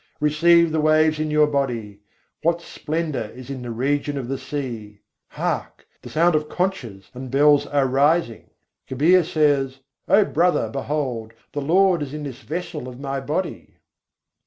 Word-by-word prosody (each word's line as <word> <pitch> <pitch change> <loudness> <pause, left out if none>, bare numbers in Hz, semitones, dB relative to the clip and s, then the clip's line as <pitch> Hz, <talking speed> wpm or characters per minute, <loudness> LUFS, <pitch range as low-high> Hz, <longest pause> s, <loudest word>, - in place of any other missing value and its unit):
Receive 170 +3 +4
the 155 0 +1
waves 155 0 +3
in 155 0 -1
your 150 0 +4
body: 120 -8 -2 0.4
what 170 +1 +1
splendour 155 -5 -3
is 125 +4 -10
in 135 -2 -6
the 120 - -6
region 140 +5 -1
of 130 -3 -4
the 135 -1 -3
sea! 115 -8 -6 0.3
Hark! - - -4 0.2
the - - -10
sounds 170 +2 +3
of 150 0 -1
conches 125 - -3
and 130 +1 -7
bells 145 +2 +4
are 140 -2 +1
rising. 140 -1 +1 0.4
Kabîr 165 +8 +4
says: 145 -4 +1 0.3
"O 205 0 +5
brother, 175 +2 +1
behold! 135 -5 -3 0.2
the 145 - -3
Lord 180 +3 +3
is 145 0 -5
in 150 - -5
this 135 -3 -7
vessel 150 +1 -5
of 125 0 -9
my 135 -1 -3
body." 150 +7 -4
145 Hz, 160 wpm, -22 LUFS, 130-155 Hz, 0.4 s, O